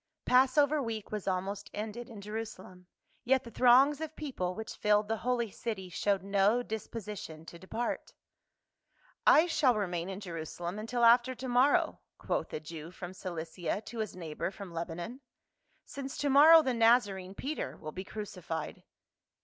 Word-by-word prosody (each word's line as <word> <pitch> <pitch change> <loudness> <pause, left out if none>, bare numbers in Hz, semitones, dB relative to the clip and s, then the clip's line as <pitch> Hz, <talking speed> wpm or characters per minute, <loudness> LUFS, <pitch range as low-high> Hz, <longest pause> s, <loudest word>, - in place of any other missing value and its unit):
PASSOVER 280 +4 +4
week 225 -4 -5
was 210 -2 -4
almost 195 +2 -2
ended 220 +3 -5
in 215 -3 -9
Jerusalem, 200 -4 -7 0.4
yet 260 +1 +3
the 235 - -10
throngs 265 +5 +5
of 315 0 -5
people 185 -12 -3
which 220 0 -6
filled 210 0 +3
the 225 +1 -1
holy 240 -2 -1
city 190 -5 -5
showed 195 +2 0
no 200 +4 +2
disposition 210 -7 -6
to 170 - -11
depart. 225 +6 -4 0.6
" - - -20
I 315 - +6
shall 280 -7 +3
remain 180 -4 -2
in 190 0 -5
Jerusalem 175 0 -5
until 235 +2 +1
after 240 +2 +5
to 255 +2 -6
morrow," 255 +3 +3 0.2
quoth - - -2
a - - -3
Jew 155 +1 -8
from 180 0 -8
Cilicia 175 +1 -4
to 235 - -7
his 215 -4 -3
neighbor 165 -3 -4
from 195 -2 -10
Leba 165 0 -4
non, 200 +10 -6 0.7
"since 275 -1 -7
to 285 -1 0
morrow 315 +4 +9
the 260 - 0
Nazarene, 205 -5 +3
Peter, 295 +8 -4
will 155 - -7
be 185 +4 -6
crucified." 185 -6 -6
210 Hz, 160 wpm, -31 LUFS, 185-245 Hz, 0.7 s, morrow